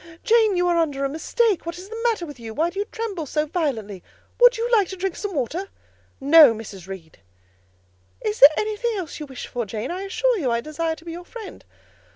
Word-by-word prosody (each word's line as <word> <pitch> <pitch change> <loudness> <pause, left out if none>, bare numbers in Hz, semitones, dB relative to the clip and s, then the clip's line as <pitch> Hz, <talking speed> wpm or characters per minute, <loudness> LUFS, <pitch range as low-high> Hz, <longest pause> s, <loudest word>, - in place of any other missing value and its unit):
"Jane, 445 -4 +4
you 355 0 +2
are 345 -1 +2
under 285 -4 0
a - - -1
mistake: 400 - 0
what 335 +1 -6
is 370 +2 -10
the 450 +2 -7
matter 420 -7 -2
with 290 -5 -11
you? 225 -1 -8
Why 330 +3 +1
do 390 - -6
you 410 - 0
tremble 415 -8 -5
so 300 +2 0
violently? 245 - -3 0.4
Would - - +7
you 460 +1 -1
like 420 -5 +4
to 380 - -6
drink 375 -1 -3
some 405 -4 -5
water?" 325 - -2 0.5
"No, 285 -3 +7
Mrs. 200 -4 -9
Reed." 180 -5 -10 1.0
"Is 215 0 -3
there 280 - +11
anything 435 +1 -1
else 340 -5 -6
you 300 - -6
wish 265 -2 -8
for, 245 - -4
Jane? 215 - -4
I 365 +2 -4
assure 440 +4 0
you, 270 -7 0
I 235 0 +1
desire 320 +5 -3
to 325 - -17
be 335 - -6
your 345 +2 -7
friend." 440 +3 -10
335 Hz, 220 wpm, -23 LUFS, 275-405 Hz, 1.0 s, there